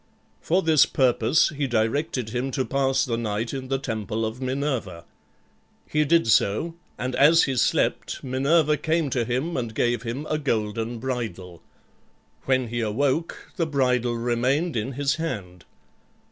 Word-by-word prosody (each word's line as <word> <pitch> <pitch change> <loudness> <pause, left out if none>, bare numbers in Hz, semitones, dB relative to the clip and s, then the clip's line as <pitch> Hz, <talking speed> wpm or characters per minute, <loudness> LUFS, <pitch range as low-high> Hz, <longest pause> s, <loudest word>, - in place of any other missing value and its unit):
For 185 +3 +1
this 160 -3 +5
purpose 125 +1 +3
he 145 -3 -2
directed 120 +2 -1
him 125 +3 -2
to 130 -3 0
pass 135 -1 +1
the 115 -2 -2
night 110 0 -2
in 130 -1 -5
the 135 +1 0
temple 110 -3 -3
of 110 +4 -5
Minerva. 130 - -3 0.8
He 150 0 +1
did 165 +3 +3
so, 110 +9 +2 0.2
and 125 0 -3
as 150 +5 +6
he 135 - 0
slept 120 - 0
Minerva 145 +4 +2
came 160 0 0
to 120 -2 +1
him 130 +9 -2
and 115 -3 -3
gave 120 -1 +1
him 125 +5 -4
a 155 - -1
golden 115 -3 -2
bridle. 110 -9 -5 0.8
When 130 -3 +1
he 120 +1 -2
awoke 135 +9 -1
the 165 - 0
bridle 125 -4 +1
remained 125 +7 0
in 115 +4 -2
his 140 +3 0
hand. 100 - -5
130 Hz, 150 wpm, -24 LUFS, 115-145 Hz, 0.8 s, as